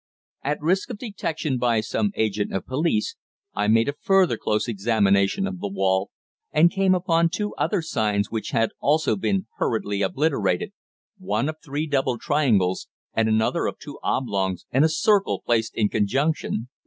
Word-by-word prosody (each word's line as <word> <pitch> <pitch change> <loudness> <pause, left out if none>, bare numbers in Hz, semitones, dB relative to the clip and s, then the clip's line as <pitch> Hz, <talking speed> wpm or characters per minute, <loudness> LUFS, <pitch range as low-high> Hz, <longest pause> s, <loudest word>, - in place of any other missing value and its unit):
At 145 +2 -1
risk 185 - +1
of 240 - -5
detection 160 - -3
by 120 -2 +2
some 205 - -1
agent 105 -2 0
of 95 - -2
police, 130 -5 -1 0.4
I 105 0 0
made 115 +2 +4
a 140 - 0
further 190 -3 +3
close 105 0 -1
examination 100 - +2
of 195 -2 -5
the 205 - -3
wall, 95 - 0 0.4
and 165 +3 +5
came 195 -1 +3
upon 170 -2 +2
two 210 +4 -3
other 195 -6 -1
signs 105 -9 0
which 110 -1 -3
had 115 0 +1
also 155 +2 +2
been 195 0 -1
hurriedly 100 -3 -1
obliterated 110 - 0 0.5
one 185 -6 -1
of 155 0 -4
three 145 +2 -3
double 135 -4 0
triangles, 115 - +1 0.3
and 110 -1 +2
another 110 0 +1
of - - -4
two - - -10
oblongs 100 -7 -1
and 135 +4 +4
a 160 - +4
circle 200 +5 +2
placed 115 -2 0
in 105 - +2
conjunction. 120 +2 -1
130 Hz, 165 wpm, -24 LUFS, 105-165 Hz, 0.5 s, and